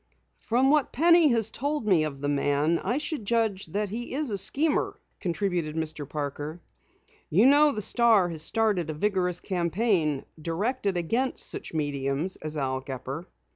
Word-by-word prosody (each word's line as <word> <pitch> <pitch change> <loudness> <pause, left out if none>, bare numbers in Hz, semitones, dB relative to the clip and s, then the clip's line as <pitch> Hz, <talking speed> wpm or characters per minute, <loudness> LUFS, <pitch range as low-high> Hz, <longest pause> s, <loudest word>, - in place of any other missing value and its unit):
"From 255 +4 +2
what 300 -3 +2
Penny 335 +2 +5
has 225 -4 +2
told 285 -1 -2
me 180 -7 +3
of 140 -3 -6
the 145 - -1
man, 145 +3 +1
I 245 - -1
should 300 -4 -3
judge 220 -4 0
that 205 +5 -2
he 240 +5 -5
is 290 -4 -2
a 200 - -1
schemer," 300 +9 +1 0.2
contributed 175 -4 -2
Mr. 155 -3 -4
Parker. 150 +2 -5 0.7
"You 200 +9 +4
know 290 +2 +6
the 210 -6 -3
Star 225 -4 +4
has 160 -2 -5
started 205 -2 0
a 155 - -3
vigorous 180 0 +1
campaign 175 - 0 0.2
directed 200 - -1
against 235 +10 -1
such - - -6
mediums 145 +3 -1
as 155 0 -4
Al 130 -2 -1
Gepper." 135 +5 -6
185 Hz, 160 wpm, -27 LUFS, 155-235 Hz, 0.7 s, know